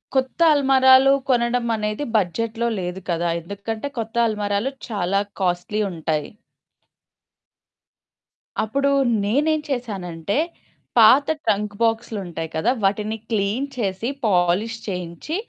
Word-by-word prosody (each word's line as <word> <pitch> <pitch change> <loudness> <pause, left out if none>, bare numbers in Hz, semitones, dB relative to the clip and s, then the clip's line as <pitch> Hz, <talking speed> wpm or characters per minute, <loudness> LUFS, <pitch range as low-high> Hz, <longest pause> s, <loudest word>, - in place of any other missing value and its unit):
కొత్త 260 +4 0
అల్మరాలు 265 -1 +6 0.2
కొనడమనేది 235 -1 0
బడ్జెట్‌లో 225 +4 0
లేదు 180 +1 -4
కదా! 170 0 0
ఎందుకంటే 205 - -5
కొత్త 225 0 -5
అల్మరాలు 210 +3 -1 0.2
చాలా 195 -2 0 0.2
కాస్ట్‌లీ 180 +3 -1
ఉంటాయి. 155 -2 -2 2.3
అప్పుడు 275 +6 0 0.4
నేనేం 300 +8 +2
చేశానంటే, 200 - -3 0.6
పాత 250 +5 +7 0.2
ట్రంక్ 205 0 0
బాక్స్‌లుంటాయి 210 -8 -1
కదా! 190 +10 +2
వాటిని 210 +3 0
క్లీన్ 220 +5 0
చేసి, 195 0 -2 0.2
పాలిష్ 195 +4 +2
చేయించి, 180 - -4
215 Hz, 95 wpm, -22 LUFS, 185-240 Hz, 2.3 s, పాత